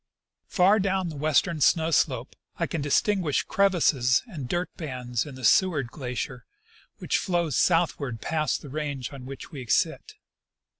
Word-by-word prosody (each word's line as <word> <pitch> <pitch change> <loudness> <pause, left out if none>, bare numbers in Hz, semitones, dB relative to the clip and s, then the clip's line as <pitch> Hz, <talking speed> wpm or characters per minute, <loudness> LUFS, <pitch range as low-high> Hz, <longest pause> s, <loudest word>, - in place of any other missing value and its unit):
" - - -64
Far 200 +3 +4
down 190 -2 0
the 155 - -7
western 155 +2 +1
snow 160 +3 +3
slope 130 -5 0 0.2
I 170 - 0
can 160 -1 -3
distinguish 160 +2 +1
crevasses 160 -10 +2
and 155 - -7
dirt 175 +1 -1
bands 125 -6 -4
in 140 - -9
the 130 -2 -5
Seward 150 - +3
glacier, 125 -1 -5 0.5
which - - 0
flows 170 -7 -1
southward 155 -8 +1
past 155 +5 -1
the 145 - -9
range 140 -2 -4
on 130 -2 -9
which 135 +4 -9
we 140 -5 -7
sit. - - 0
150 Hz, 155 wpm, -26 LUFS, 130-175 Hz, 0.5 s, Far